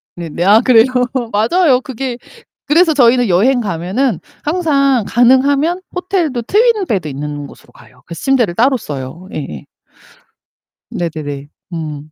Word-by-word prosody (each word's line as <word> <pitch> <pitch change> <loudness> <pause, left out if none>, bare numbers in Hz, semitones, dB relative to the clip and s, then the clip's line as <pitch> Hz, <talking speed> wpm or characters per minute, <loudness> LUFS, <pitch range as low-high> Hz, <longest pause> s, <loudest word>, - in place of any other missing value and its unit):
네네. 170 -1 -4
아, 205 +4 +6
그래요? 235 -3 +5 0.5
맞아요. 255 - +2
그게 260 -1 -5 0.5
그래서 325 +2 +4
저희는 245 -3 +3
여행 235 +9 +3
가면은 195 - -1 0.2
항상 280 -6 +1
가능하면 275 +8 +2
호텔도 360 -8 -1
트윈 430 - +2
베드 190 - -1
있는 145 0 -6
곳으로 - - -17
가요. - - -19
그래서 170 -1 -9
침대를 245 -10 +1
따로 260 +5 +3
써요. 150 - -8
예예. 75 - -6 1.2
네네네. 150 -4 -5 0.3
음. 155 -2 -6
235 Hz, 285 characters per minute, -15 LUFS, 170-275 Hz, 1.2 s, 아